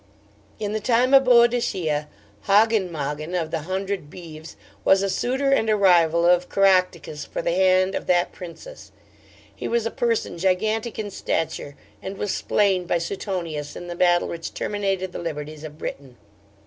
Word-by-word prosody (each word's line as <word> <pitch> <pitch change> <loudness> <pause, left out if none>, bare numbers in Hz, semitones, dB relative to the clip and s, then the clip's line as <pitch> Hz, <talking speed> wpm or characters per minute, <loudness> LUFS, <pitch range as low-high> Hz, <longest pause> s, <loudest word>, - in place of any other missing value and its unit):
'In 205 -1 -3
the 215 - -1
time 245 +4 +2
of 270 -1 +7
Boadicea, 235 -11 +3 0.4
Hogyn 210 -1 +4
Mogyn, 155 +2 -4
of 160 -1 -4
the 160 -1 -4
hundred 190 -4 -3
Beeves, 160 -2 -11 0.3
was 195 0 +4
a 195 - 0
suitor 265 +6 0
and 225 -5 +2
a 215 - +4
rival 170 -4 +4
of 180 0 +3
Caractacus 185 -6 +2
for - - -5
the - - 0
hand 185 +1 +3
of - - -4
that 175 -1 +2
Princess. 185 - -11 0.6
He - - -5
was 235 -1 0
a 230 - -1
person 230 -7 -1
gigantic 215 +5 0
in 210 -2 -4
stature, 155 -5 -3 0.3
and 195 +1 -6
was 205 - -2
slain 195 -3 +1
by 175 - +2
Suetonius 170 -4 -4
in 175 - -7
the 175 0 -6
battle 175 0 +3
which 165 -1 -6
terminated 195 -3 -2
the - - -6
liberties 155 -2 -6
of 155 -1 -9
Britain. 135 -5 -7
185 Hz, 165 wpm, -23 LUFS, 165-210 Hz, 0.6 s, of